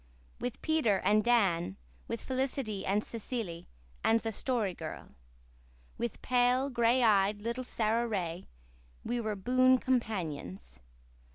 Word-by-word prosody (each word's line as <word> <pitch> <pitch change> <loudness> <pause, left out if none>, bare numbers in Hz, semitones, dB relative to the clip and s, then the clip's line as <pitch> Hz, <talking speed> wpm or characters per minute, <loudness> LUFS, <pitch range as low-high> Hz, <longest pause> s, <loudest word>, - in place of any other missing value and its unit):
With 245 0 -5
Peter 310 -11 +2
and 210 +1 +3
Dan, 190 - +2 0.3
with 230 - -4
Felicity 260 -5 -2
and 205 +2 +2
Cecily 220 -7 -5 0.4
and 225 +1 +4
the 225 0 -3
Story 220 -4 0
Girl, - - -7 0.9
with 235 -1 -4
pale, 250 +2 +2
gray 240 +1 +3
eyed 205 -1 +3
little 235 +3 -2
Sara 230 0 0
Ray, 180 -5 -3 0.6
we 240 0 -1
were 215 -2 -2
boon 255 +6 +4
companions. 160 - -3
225 Hz, 120 wpm, -31 LUFS, 195-245 Hz, 0.9 s, and